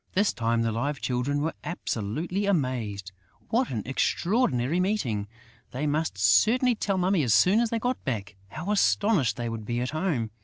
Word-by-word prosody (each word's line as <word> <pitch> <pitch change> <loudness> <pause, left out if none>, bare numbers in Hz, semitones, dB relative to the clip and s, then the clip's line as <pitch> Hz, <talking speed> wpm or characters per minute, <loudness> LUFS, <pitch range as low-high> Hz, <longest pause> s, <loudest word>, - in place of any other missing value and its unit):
This 205 +2 +2
time, 115 -1 0
the 115 - 0
Live 135 +6 -2
Children 130 +3 -1
were 160 - -1
absolutely 170 - -3
amazed. 120 - -1 0.4
What 245 +3 +1
an 110 -4 -3
extraordinary 155 - +1
meeting! 130 - -1 0.4
They 135 +4 -3
must 150 -5 -1
certainly 215 - +4
tell 200 -3 -1
Mummy 185 -1 +2
as 120 -6 +3
soon 190 - +5
as 235 -1 +1
they 230 - -1
got 245 +2 -2
back! 105 -5 -4
How 160 - -5
astonished 200 - +2
they 120 -1 -3
would 115 -1 -5
be 120 +3 -2
at 125 +1 -2
home! 155 - -1
140 Hz, 175 wpm, -27 LUFS, -, 0.4 s, soon